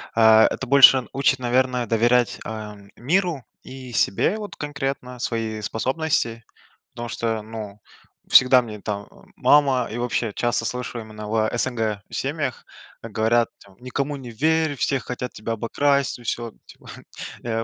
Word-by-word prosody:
э, 115 - +2
это 110 +3 +5
больше 135 -1 +7
учит, 135 -1 +2
наверное, 125 0 +1
доверять, 120 +2 +2
э, 110 -1 -6 0.2
миру 165 +1 0 0.2
и 130 -2 -10
себе 165 - +1
вот 210 -1 -7
конкретно, 135 -3 -4
свои 115 -3 -3
способности. 115 0 -1 0.5
Потому 120 0 -6
что, 115 -1 -2
ну, 105 -2 -8 0.5
всегда 125 0 +7
мне 105 -3 -8
там 100 0 -5 0.3
мама, 135 -4 +3
и 110 - -5
вообще 120 -2 -1
часто 120 +1 -1
слышу 125 0 -4
именно 110 -1 -9
в 110 0 +1
СНГ 115 -4 -1
семьях, 140 -2 -3 0.4
говорят 115 +1 +1
там: 100 -1 -20
"Никому 140 +3 -3
не 130 -3 -9
верь, 155 +4 +1
все 135 +2 0
хотят 125 0 -5
тебя 110 +2 -5
обокрасть, 140 +4 0
и - - -14
всё", 120 0 -3
типа, - - -17 0.6
э, 115 -1 -2
120 Hz, 145 wpm, -23 LUFS, 110-135 Hz, 0.6 s, больше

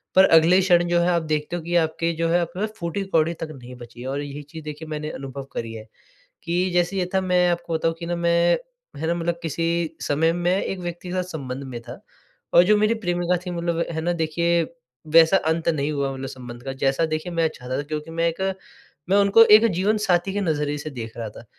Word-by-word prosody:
पर 190 +1 +8
अगले 165 +2 +6
क्षण 175 -2 +4
जो 175 0 +2
है 175 - +2
आप 170 -1 +2
देखते 150 +3 -2
हो 175 - -3
कि 170 +2 -3
आपके 165 0 +1
जो 165 - +2
है 175 +1 +3
आपके 170 +1 -4
पास 215 +1 -2
फूटी 170 +2 -3
कौड़ी 165 -3 +1
तक - - -3
नहीं 125 -3 -11
बची 120 -1 -12
है। 130 - -6
और 140 +2 -2
यही 145 0 -6
चीज़ 155 +2 -10
देखिए 150 +1 -7
मैंने 150 0 -4
अनुभव 135 0 -7
करी 115 -1 -4
है 110 -1 -9 0.6
कि 175 +2 0
जैसे 175 +2 +1
ये 185 - +1
था 190 - +2
मैं 180 -1 +2
आपको 170 -1 -2
बताऊँ 165 0 +1
कि 170 - -5
न 175 0 -2
मैं 170 0 +3 0.4
है 160 +3 -3
ना, 170 - +2
मतलब 170 0 -2
किसी 165 +1 -1
समय 160 +3 +2
में 175 +1 +1
एक 190 - -4
व्यक्ति 175 0 -6
के - - -4
साथ 185 0 0
संबंध 135 -1 -6
में 130 -3 -6
था - - -10 0.5
और 175 - +8
जो 210 +3 +4
मेरी 215 +2 +3
प्रेमिका 175 -4 0
थी। 180 - -4
मतलब 170 -1 -2
है 160 -1 -3
ना, 175 +2 0
देखिए 170 +1 +1 0.5
वैसा 165 +3 +7
अंत 160 -2 -1
नहीं 150 -2 0
हुआ 140 -2 -1
मतलब 135 0 -6
संबंध 120 -2 -9
का 135 0 -4
जैसा 135 +4 +2
देखिए 155 +2 -3
मैं 165 -1 +2
चाहता 130 -4 -5
था। - - -1
क्योंकि 150 +2 -5
मैं 165 +1 +1
एक, 165 +3 -7 0.7
मैं 195 - +4
उनको 200 +3 +7
एक 220 - +2
जीवनसाथी 190 0 +1
के 205 - -1
नज़रिए 150 -4 -1
से 150 +1 -6
देख 115 -5 -8
रहा 115 -2 -4
था 110 - -13
165 Hz, 235 wpm, -23 LUFS, 150-175 Hz, 0.7 s, पर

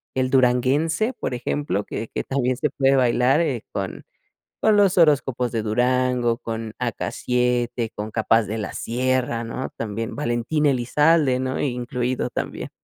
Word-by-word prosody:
el 130 -1 +1
duranguense, 135 - +2
por - - -4
ejemplo, 120 -5 -2
que 110 - -5
que - - -2
también 130 -2 0
se 150 - 0
puede 135 -1 +3
bailar, 125 +4 +3
eh, 135 -9 -1
con 95 -2 -5 0.6
con 215 - +5
Los 200 -2 +4
Horóscopos 135 -6 +3
de 115 -2 -1
Durango, 125 +1 +1
con 115 -2 -5
AK-7, 125 -2 -1
con 105 +1 -5
K-Paz 110 0 +2
de 110 - -3
la 105 - -4
Sierra, 125 -1 -1
¿no?, 115 +3 -4
también 115 +1 -4
Valentín 135 +3 -1
Elizalde, 140 +2 +3
¿no?, 130 0 -2
incluido 125 -1 -2
también. - - -4
125 Hz, 145 wpm, -23 LUFS, 115-135 Hz, 0.6 s, con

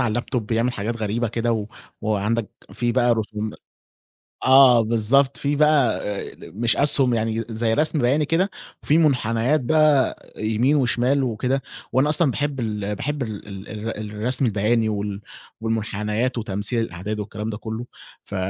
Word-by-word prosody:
على 120 - +1
اللاب 120 +3 -2
توب 125 -5 -2
بيعمل 115 +2 0
حاجات 115 +1 -3
غريبة 110 +1 -1
كده 115 +1 -1
و 110 -2 -2 0.3
وعندك 110 +1 -1 0.2
في 120 -1 -1
بقى 120 -1 +3
رسوم 110 -1 -4 0.9
آه 130 -3 +7
بالضبط، 120 +5 +2
في 145 +1 -1
بقى 150 -4 +3 0.3
ال 105 - -13
مش 120 0 +3
أسْهُم، 140 -3 +6
يعني 115 0 -1
زي 110 0 0
رسم 155 +4 +2
بياني 140 +4 +2
كده 165 +6 +1 0.3
فيه 150 - +2
مُنحنيات 130 -2 +2
بقى 150 0 +2
يمين 110 +6 +1
وشمال 130 +1 +2
وكده 125 +3 -1 0.3
وأنا 135 +3 +3
أصلًا 155 -3 +4
باحب 145 -1 -2
ال 105 -2 -3
باحب 145 +5 -3
ال 110 -4 -7
ال 100 -1 -9
الر 105 -1 -6
الرسم 125 +4 +1
البياني 110 +1 +1
وال 100 -1 -3 0.4
والمُنحنيات 110 +2 -2
وتمثيل 105 +1 -2
الأعداد 105 +4 -5
والكلام 105 +1 -5
ده 105 - -4
كُلّه، 110 +2 -6 0.4
ف 100 - -8
115 Hz, 155 wpm, -22 LUFS, 110-130 Hz, 0.9 s, آه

